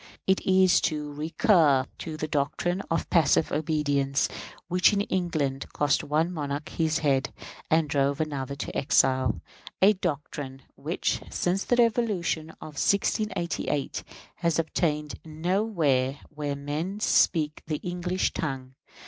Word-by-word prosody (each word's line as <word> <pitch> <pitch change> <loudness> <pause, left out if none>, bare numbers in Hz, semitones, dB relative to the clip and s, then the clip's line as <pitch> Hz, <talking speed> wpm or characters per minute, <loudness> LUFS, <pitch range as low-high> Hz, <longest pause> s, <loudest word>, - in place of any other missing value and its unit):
It 190 0 +2
is 185 -1 +4
to 150 -2 -5
recur 155 - +3
to 160 -2 -5
that 155 0 -4
doctrine 155 +6 0
of 165 -1 0
passive 160 -2 +3
obedience 145 -3 +1 0.4
which, 180 +4 +4
in 200 - +2
England, 155 -9 -2
cost 145 -2 +1
one 155 +4 +1
monarch 145 -2 -4
his 160 -1 0
head 135 -1 +2 0.4
and 160 -1 +3
drove 140 0 +1
another 140 -4 -2
into 140 - -6
exile; 130 -1 +2 0.4
a 200 +3 +6
doctrine 145 -6 -4
which, - - -2
since 185 +3 0
the 245 - +2
Revolution 215 -9 +1
of 150 -2 -6
1688, 200 -8 0 0.3
has 170 -2 +1
obtained 150 -2 -1
nowhere 160 -5 0
where 150 -2 -3
men 150 +8 -4
speak 155 -7 +2
the 155 -1 -1
English 180 +1 -1
tongue. 130 -4 -4
155 Hz, 125 wpm, -27 LUFS, 145-180 Hz, 0.4 s, a